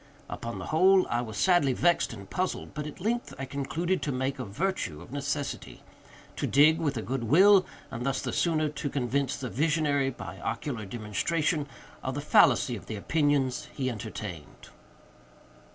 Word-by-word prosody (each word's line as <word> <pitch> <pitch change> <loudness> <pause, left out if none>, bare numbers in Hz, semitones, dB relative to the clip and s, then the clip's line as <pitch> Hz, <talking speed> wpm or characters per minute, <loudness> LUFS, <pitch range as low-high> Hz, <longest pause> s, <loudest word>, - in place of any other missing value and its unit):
Upon 115 0 -5
the - - -6
whole, 185 +4 +5
I 120 - +1
was 110 -3 -6
sadly 175 -8 +4
vexed 175 +6 +2
and 100 -4 -9
puzzled, 185 - -3
but, 150 -1 -4
at 150 - -9
length, 235 +6 -2
I 135 - -4
concluded 160 +7 -2
to 145 - -1
make 130 +1 -2
a 125 - -3
virtue 110 - -2
of - - -13
necessity—to 145 0 -6
dig 155 +4 +5
with 145 -6 -1
a 110 - -3
good 130 -1 -3
will, 185 - +6 0.2
and 115 - -4
thus 135 +1 0
the - - -4
sooner 155 -3 +1
to 145 -1 -4
convince 135 +1 -1
the 135 - -4
visionary, 145 0 +1
by 135 - -8
ocular 120 -8 -3
demonstration, 145 - -1 0.3
of 130 0 -3
the - - -2
fallacy 135 -3 +4
of 105 - -10
the 110 - -4
opinions 140 +2 +1
he 130 -2 -1
entertained. 105 -7 -8
140 Hz, 170 wpm, -28 LUFS, 120-160 Hz, 0.3 s, will